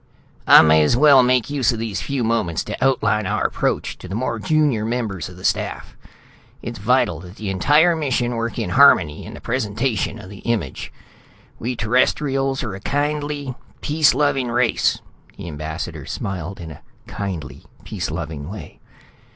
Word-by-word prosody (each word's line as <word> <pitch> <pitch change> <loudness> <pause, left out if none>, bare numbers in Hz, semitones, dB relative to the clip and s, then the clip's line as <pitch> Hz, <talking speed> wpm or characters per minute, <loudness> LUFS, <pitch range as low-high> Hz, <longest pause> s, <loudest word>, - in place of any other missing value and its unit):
"I - - +9
may 80 0 +5
as 75 +10 +3
well 140 -1 +7
make 125 0 +2
use 135 -5 +2
of 120 - -4
these 110 -3 -3
few 140 -3 -2
moments 110 -8 0
to - - -5
outline 110 -6 +1
our - - -1
approach - - -1
for - - -10
the 95 - -5
more 120 0 -2
junior 150 -5 +1
members 110 -7 -3
of 90 - -13
the 90 - -9
staff; - - -2 0.7
it's 120 0 -6
vital 110 -6 +1
that 90 +2 -12
the 105 -3 -4
entire 150 - +4
mission 125 -6 -1
work 115 0 -3
in - - -2
harmony 95 - +4
in - - -9
the - - -10
presentation 115 -1 -2
of 100 -4 -11
the 100 - -10
image. 115 -2 -3 0.7
We 125 +2 -3
Terrestrials 135 +4 +1
are 110 -6 -4
a 95 - -7
kindly, 145 +2 -2 0.3
peace 150 -3 +3
loving 135 -3 +1
race." 120 0 +1 0.4
The - - -8
ambassador 75 0 -6
smiled 95 0 -5
in 85 -2 -8
a 75 - -12 0.2
kindly, 85 -11 -6 0.2
peace - - -4
loving 80 -2 -5
way. 105 +2 -9
115 Hz, 165 wpm, -21 LUFS, 95-135 Hz, 0.7 s, I